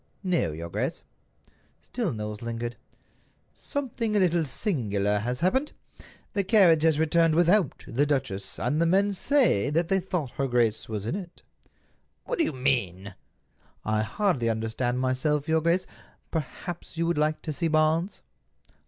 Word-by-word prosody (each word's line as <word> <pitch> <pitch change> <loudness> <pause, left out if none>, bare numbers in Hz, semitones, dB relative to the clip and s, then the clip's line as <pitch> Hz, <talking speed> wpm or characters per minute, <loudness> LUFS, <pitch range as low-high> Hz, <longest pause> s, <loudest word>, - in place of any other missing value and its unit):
"No, 175 - +1
your 80 +2 -6
grace." - - -3 0.8
Still - - -3
Knowles 105 -1 -5
lingered. 120 0 -4 0.8
"Something 240 -6 -3
a - - +4
little 175 -3 +2
singular 105 - -1
has 125 +4 -3
happened. 265 - +1 0.6
The 200 - +1
carriage 185 -6 +5
has 160 -2 +3
returned 160 +1 +3
without 175 -1 +2
the 140 +5 +1
duchess, 130 -9 -2
and 145 +6 0
the 170 - +3
men 200 +3 +3
say 235 - +2
that 165 +3 0
they 195 0 +3
thought 180 -8 -3
her 135 - -2
grace 120 -4 +1
was 105 -2 -4
in 115 - -2
it." 180 -3 -8 0.8
"What - - -3
do - - +5
you - - 0
mean?" 120 - -1 0.7
"I 110 0 +1
hardly 135 - 0
understand 115 +3 -1
myself, 135 +4 0
your 160 0 +2
grace. 170 +3 +2 0.5
Perhaps 165 +3 -5
you 165 - +1
would 170 -2 0
like 155 +1 0
to 155 - -3
see 165 +3 -1
Barnes." 160 +4 +1
155 Hz, 155 wpm, -27 LUFS, 120-175 Hz, 0.8 s, carriage